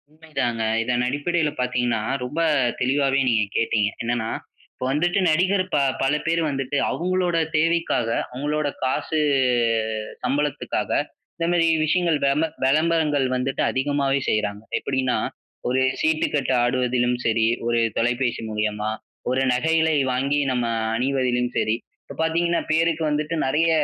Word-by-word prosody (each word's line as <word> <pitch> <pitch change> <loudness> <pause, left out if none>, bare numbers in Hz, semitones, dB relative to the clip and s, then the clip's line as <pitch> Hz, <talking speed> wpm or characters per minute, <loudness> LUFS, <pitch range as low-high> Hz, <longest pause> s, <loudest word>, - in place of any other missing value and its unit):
உண்மைதாங்க, 135 -7 -3 0.2
இதன் 125 +1 0
அடிப்படைல 150 +4 0
பாத்தீங்கன்னா, 125 -2 0 0.2
ரொம்ப 145 +6 -4 0.4
தெளிவாவே 135 +1 +2
நீங்க 110 -3 +3
கேட்டிங்க. 110 -2 +1
என்னென்னா, 115 -1 -1 0.4
இப்ப - - -5
வந்துட்டு 175 +7 +1
நடிகர் 185 +4 +2
ப - - +3 0.2
பலபேர் 150 +4 +1
வந்துட்டு 135 +1 -2
அவங்களோட 180 0 0 0.2
தேவைக்காக, 165 -6 +1 0.3
அவங்களோட 150 +3 -1 0.2
காசு 145 +4 0 1.0
சம்பளத்துக்காக, 145 +3 -1 0.5
இந்த 165 - -1
மாரி 170 -1 +3 0.2
விஷயங்கள் 170 0 +2
வெம்ப 145 +4 +2 0.2
விளம்பரங்கள் 150 0 +2
வந்துட்டு 130 +1 -1
அதிகமாவே 140 0 0
செய்றாங்க. 105 -1 -1 0.2
எப்டின்னா, 130 -1 0 0.5
ஒரு 130 +2 +1 0.2
சீட்டுக்கட்டு 155 -4 +1
ஆடுவதிலும் 125 0 +1
சரி, 110 0 +2 0.2
ஒரு 120 0 +2 0.2
தொலைபேசி 120 +1 0
மூலியமா. 105 0 -1 0.4
ஒரு 130 +1 +1
நகைகளை 160 +4 +2 0.2
வாங்கி 140 +3 +1
நம்ம 120 -2 0 0.3
அணிவதிலும் 125 -1 0
சரி. 110 - +1 0.3
இப்ப - - -11
பார்த்தீங்கன்னா, 170 +1 +1
பேருக்கு 165 0 +2
வந்துட்டு 150 +2 -1
நெறைய 150 +5 +2
135 Hz, 120 wpm, -23 LUFS, 125-160 Hz, 1.0 s, நீங்க